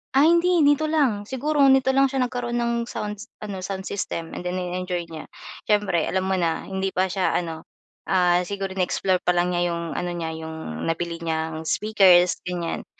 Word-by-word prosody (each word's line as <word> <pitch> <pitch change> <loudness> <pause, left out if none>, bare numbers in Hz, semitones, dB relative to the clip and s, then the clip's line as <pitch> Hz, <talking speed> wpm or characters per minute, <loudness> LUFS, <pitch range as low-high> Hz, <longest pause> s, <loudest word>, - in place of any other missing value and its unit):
Ah, 275 - +6
hindi 340 0 +4
dito 290 +2 +3
lang, 250 -10 +1
siguro 290 +3 -2
nito 265 0 +4
lang 270 +1 +4
siya 265 -1 0
nagkaroon 245 -1 -3
ng 235 0 0
sound 210 -3 -5 0.2
ano 200 -3 -5
sound 190 0 -5
system 170 -4 -4
and 180 - -5
then 180 - -2
ini-enjoy 180 -1 -3
niya 155 - -8 0.4
siyempre 205 -6 +2
alam 190 0 0
mo 190 -1 0
na? 165 -2 0
Hindi 190 0 -3
pa 185 0 +1
siya 190 -2 0
ano 165 -2 -3 0.8
siguro, 195 -1 -4
in-explore 185 0 0
pa 180 - +4
lang 175 +1 +2
niya 175 0 +1
'yong 170 -1 -4
ano 175 0 -2
niya, 165 -1 -3
'yong 160 - -6
nabili 165 +1 -2
niyang 160 -1 -3
speakers 185 -2 +4
gan'yan. 175 -2 -3
190 Hz, 180 wpm, -24 LUFS, 170-235 Hz, 0.8 s, Ah